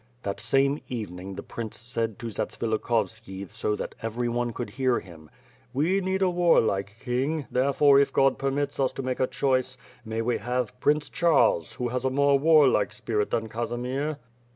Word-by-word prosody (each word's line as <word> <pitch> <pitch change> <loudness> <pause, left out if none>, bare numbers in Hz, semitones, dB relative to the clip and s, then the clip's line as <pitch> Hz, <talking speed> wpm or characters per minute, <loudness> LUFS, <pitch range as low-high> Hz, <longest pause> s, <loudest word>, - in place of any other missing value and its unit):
The 100 - -1
same 140 +2 +2
evening 95 -6 -5
the 100 - -6
prince 115 -2 -6
said 115 -1 -3
to 120 - -8
Zatsvilikhovski 110 -3 -2
so 105 - -1
that - - -5
every 115 +2 -2
on 120 0 -1
e - - -5
could 105 - -5
hear 130 +1 +1
him: 80 -4 -14 0.5
"We 175 +8 +2
need 190 +1 0
a 185 - +4
warlike 110 - +2
king, 135 +4 -1
there 130 +2 +2
fore 140 0 +5
if 140 - +2
God 135 -1 +3
permits 140 +1 -1
us 135 -1 +2
to 135 - -5
make 130 0 -2
a 130 - +2
choice, 130 -1 0 0.3
may 110 0 -3
we 120 +1 0
have 125 0 -2
Prince 150 +2 +2
Charles, 145 - +2
who 125 -1 -3
has 125 +1 -2
a 130 - +2
more 140 +1 +3
warlike 145 -9 +4
spirit 105 0 -1
than 115 -1 -1
Casimir." 125 +6 -3
125 Hz, 180 wpm, -26 LUFS, 110-140 Hz, 0.5 s, fore